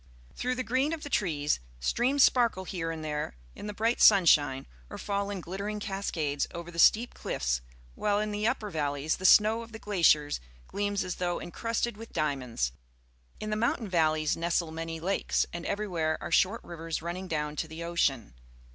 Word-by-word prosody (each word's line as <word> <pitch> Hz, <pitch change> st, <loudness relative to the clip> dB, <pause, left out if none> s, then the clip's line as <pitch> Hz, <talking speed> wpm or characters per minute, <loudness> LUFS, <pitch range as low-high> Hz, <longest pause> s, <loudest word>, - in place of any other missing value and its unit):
Through 255 Hz, 0 st, -1 dB
the 255 Hz, -, -2 dB
green 260 Hz, +7 st, +1 dB
of 320 Hz, -, -5 dB
the 290 Hz, -, -7 dB
trees, 155 Hz, -9 st, +1 dB, 0.2 s
streams 255 Hz, -, +2 dB
sparkle 235 Hz, -7 st, +3 dB
here 175 Hz, -3 st, -4 dB
and 160 Hz, -1 st, -5 dB
there 150 Hz, -, -3 dB, 0.2 s
in -, -, -8 dB
the -, -, -3 dB
bright 225 Hz, +3 st, 0 dB
sunshine 150 Hz, -9 st, +6 dB, 0.2 s
or -, -, -7 dB
fall 200 Hz, 0 st, -2 dB
in 200 Hz, -2 st, -4 dB
glittering 200 Hz, +5 st, -4 dB
cascades 180 Hz, -8 st, -2 dB
over 170 Hz, 0 st, -6 dB
the 170 Hz, -, -7 dB
steep 230 Hz, +7 st, +5 dB
cliffs, -, -, -2 dB, 0.3 s
while 205 Hz, -, +1 dB
in 210 Hz, 0 st, -1 dB
the 210 Hz, +1 st, 0 dB
upper 230 Hz, -4 st, -1 dB
valleys 145 Hz, -1 st, -1 dB
the 185 Hz, -, +2 dB
snow 220 Hz, +4 st, +6 dB
of 230 Hz, 0 st, -11 dB
the -, -, -6 dB
glaciers 165 Hz, -8 st, +3 dB, 0.3 s
gleams 205 Hz, -1 st, -1 dB
as 185 Hz, -1 st, -4 dB
though 175 Hz, -1 st, -1 dB
encrusted 230 Hz, +4 st, -2 dB
with 225 Hz, +1 st, -11 dB
diamonds. 125 Hz, -, -1 dB, 0.7 s
In 215 Hz, 0 st, -4 dB
the -, -, +1 dB
mountain 225 Hz, 0 st, 0 dB
valleys 155 Hz, -4 st, +2 dB
nestle 170 Hz, -1 st, 0 dB
many 165 Hz, 0 st, -5 dB
lakes, 190 Hz, +4 st, 0 dB
and 170 Hz, 0 st, -5 dB
everywhere 175 Hz, -7 st, -1 dB
are -, -, -6 dB
short 210 Hz, +5 st, +3 dB
rivers 165 Hz, -2 st, -5 dB
running 180 Hz, +2 st, -4 dB
down 150 Hz, -2 st, -2 dB
to 160 Hz, -, -2 dB
the 160 Hz, +1 st, -7 dB
ocean. 145 Hz, -, 0 dB
180 Hz, 180 wpm, -29 LUFS, 155-210 Hz, 0.7 s, sunshine